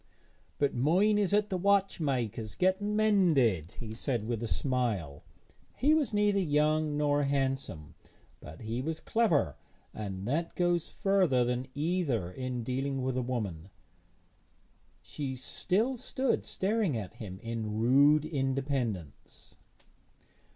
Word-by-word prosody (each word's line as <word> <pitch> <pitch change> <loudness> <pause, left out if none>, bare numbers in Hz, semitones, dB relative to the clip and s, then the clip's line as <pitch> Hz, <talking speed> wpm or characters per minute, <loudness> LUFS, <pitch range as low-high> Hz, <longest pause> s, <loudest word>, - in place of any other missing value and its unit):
'But 145 - +1
mine 185 - +3
is 200 -2 +1
at 210 0 +2
the 185 - 0
watchmaker's 140 - 0
getting 190 +3 +1
mended,' 155 - +3
he 110 -2 -7
said 115 -2 -2
with 115 -2 -2
a 115 - -2
smile. 110 - -1 0.6
He 295 +4 +4
was 310 -4 +2
neither 205 -1 +2
young 150 -2 +1
nor 145 -1 +2
handsome, 135 - -2 0.5
but 80 +1 -11
he 115 +3 -3
was 160 +3 -3
clever, 165 - +1 0.4
and 100 -2 -5
that 165 +6 -1
goes 175 -2 +1
further 185 -11 +2
than 125 +1 -2
either 145 - -1
in 130 +1 -4
dealing 135 +2 -2
with 130 -1 -1
a 130 - 0
woman. 105 -9 -4 1.3
She 135 +6 -5
still 210 - 0
stood 260 +1 -1
staring 195 - 0
at 100 -5 -7
him 95 -4 -8
in 115 -2 -3
rude 140 +6 +5
independence. 135 - -3
135 Hz, 125 wpm, -30 LUFS, 115-180 Hz, 1.3 s, rude